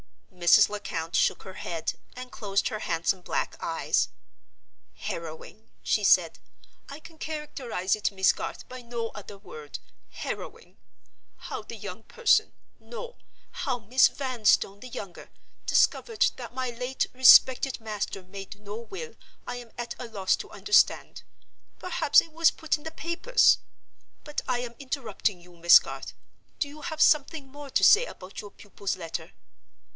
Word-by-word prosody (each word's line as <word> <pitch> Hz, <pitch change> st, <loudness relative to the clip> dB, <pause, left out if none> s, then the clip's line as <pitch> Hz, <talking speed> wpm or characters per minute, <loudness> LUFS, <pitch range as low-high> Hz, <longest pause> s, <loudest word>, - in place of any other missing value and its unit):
Mrs. 175 Hz, -1 st, +6 dB
Lecount 170 Hz, -5 st, -4 dB
shook -, -, +2 dB
her 190 Hz, -, -9 dB
head, 165 Hz, -3 st, -4 dB, 0.2 s
and 250 Hz, 0 st, -8 dB
closed 200 Hz, -2 st, -1 dB
her 215 Hz, -, -4 dB
handsome 170 Hz, +1 st, -1 dB
black -, -, -2 dB
eyes. -, -, 0 dB, 0.9 s
"Harrowing," 165 Hz, +6 st, -7 dB
she -, -, +1 dB
said; -, -, +4 dB, 0.5 s
"I 280 Hz, +2 st, -8 dB
can 320 Hz, 0 st, -15 dB
characterize 270 Hz, -, -2 dB
it, 210 Hz, -, -1 dB
Miss 190 Hz, -1 st, +3 dB
Garth, -, -, -6 dB
by 255 Hz, 0 st, -9 dB
no 235 Hz, -1 st, -4 dB
other 205 Hz, -1 st, -10 dB
word—harrowing. 155 Hz, -7 st, -9 dB, 0.6 s
How -, -, -6 dB
the -, -, -9 dB
young -, -, -8 dB
person—no! 480 Hz, +1 st, -1 dB, 0.3 s
how 265 Hz, -6 st, -2 dB
Miss 240 Hz, +4 st, +5 dB
Vanstone, 230 Hz, -6 st, +1 dB
the 255 Hz, -, -9 dB
younger—discovered 240 Hz, -, -1 dB
that -, -, -9 dB
my 255 Hz, -1 st, -2 dB
late 250 Hz, +2 st, -2 dB
respected 260 Hz, 0 st, +6 dB
master 210 Hz, -3 st, -4 dB
made 195 Hz, +2 st, -10 dB
no 205 Hz, +1 st, -7 dB
will 385 Hz, -, -8 dB, 0.3 s
I 245 Hz, -, -5 dB
am 240 Hz, -1 st, -10 dB
at 240 Hz, 0 st, -4 dB
a 245 Hz, -, -6 dB
loss 195 Hz, -4 st, +1 dB
to -, -, -8 dB
understand. 415 Hz, -, +2 dB, 0.6 s
Perhaps -, -, +4 dB
it 330 Hz, -, -13 dB
was 330 Hz, 0 st, +5 dB
put 315 Hz, -, -1 dB
in 295 Hz, -, -17 dB
the 320 Hz, -, -5 dB
papers? 340 Hz, +10 st, +3 dB, 0.6 s
But 295 Hz, -1 st, -4 dB
I 250 Hz, -2 st, 0 dB
am 240 Hz, -1 st, -6 dB
interrupting 235 Hz, -, -2 dB
you, 175 Hz, 0 st, -17 dB
Miss 170 Hz, +1 st, +9 dB
Garth. -, -, -5 dB, 0.4 s
Do 295 Hz, +1 st, -4 dB
have 315 Hz, 0 st, -4 dB
something 300 Hz, -1 st, +2 dB
more 285 Hz, +1 st, -10 dB
to -, -, +1 dB
say 455 Hz, +4 st, +7 dB
about 185 Hz, +2 st, -9 dB
your 205 Hz, -, -10 dB
pupil's 200 Hz, -1 st, -5 dB
letter?" 165 Hz, -3 st, -6 dB
240 Hz, 145 wpm, -27 LUFS, 195-290 Hz, 0.9 s, Miss